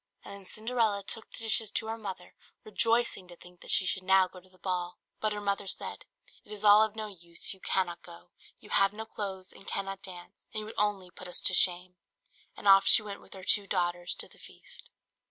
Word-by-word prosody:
And - - -9
then 200 -1 -12
Cinderella 220 -1 -1
took 225 +3 -6
the - - -10
dishes 225 -1 +2
to - - -1
her 220 0 -3
mother, 190 -4 -8 0.3
rejoicing 225 -3 0
to 175 - -13
think 180 +1 -18
that - - -13
she 190 - +3
should 190 - -1
now 190 0 +4
go 185 - -14
to 185 +1 -23
the 185 - -24
ball. 180 -1 -4 0.2
But 215 - -1
her 210 - -3
mother 200 -1 -2
said, - - -5 0.4
"It - - -17
is 210 0 -6
all 210 0 +7
of 220 -1 0
no 220 -1 -4
use, 170 -4 -6
you 190 - -17
cannot 175 -2 -1
go, 175 0 -14 0.3
you - - -16
have 195 0 +3
no 220 +1 -7
clothes, 195 -4 -6
and 195 - -16
cannot 195 0 -3
dance, 180 +1 -12
and 215 - -1
you - - -7
would 220 - -10
only 200 -3 -1
put 185 - -11
us 180 - -3
to 185 - +7
shame:" 180 0 +4 0.6
and - - -5
off 195 0 +7
she - - +10
went 200 -1 -8
with - - -12
her 190 - -11
two 200 +1 +3
daughters 175 -2 -1
to - - -1
the - - -20
feast. - - -13
195 Hz, 230 wpm, -29 LUFS, 180-210 Hz, 0.6 s, she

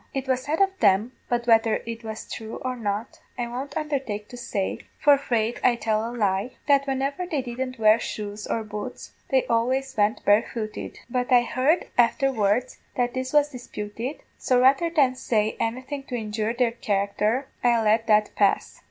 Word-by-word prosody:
It 270 0 -2
was 260 -1 +1
said 300 +4 -2
of 390 0 +4
them 205 +3 +3 0.2
but 240 -1 0
whether 225 -1 +4
it 230 0 -6
was 220 0 -6
thrue 220 -1 -7
or 255 0 -1
not 215 0 -4 0.2
I 240 - -1
won't 265 +4 -5
undhertake 265 -9 -3
to - - -9
say, 205 -5 -3 0.2
for 290 -1 +6
'fraid 235 -4 -1
I'd 240 -2 +3
tell 215 -1 +1
a 230 - -3
lie 205 0 -1
that 280 -1 +4
whenever 275 +6 -1
they 300 -7 -1
didn't 255 +1 -4
wear 215 0 +5
shoes 210 -1 -5
or 225 - -1
boots 210 -1 -7 0.2
they 265 -2 +2
always 260 +3 0
went 210 +1 +1
barefooted; 215 +1 0
but 250 +1 -2
I 245 -1 +6
heard 265 +8 +1
aftherwards 240 -2 +2 0.2
that 245 -1 0
this 260 0 -3
was 295 -1 +4
disputed, 240 +1 -6 0.2
so 250 -1 +2
rather 270 +6 +4
than 285 -6 +3
say 220 -4 0
anything 260 +5 -3
to 250 - -5
injure 215 0 -2
their 240 -1 +1
character, 215 +3 0 0.2
I'll 235 -2 +3
let 220 +2 +2
that 210 -1 +3
pass. 200 -2 +1
240 Hz, 180 wpm, -25 LUFS, 215-260 Hz, 0.2 s, for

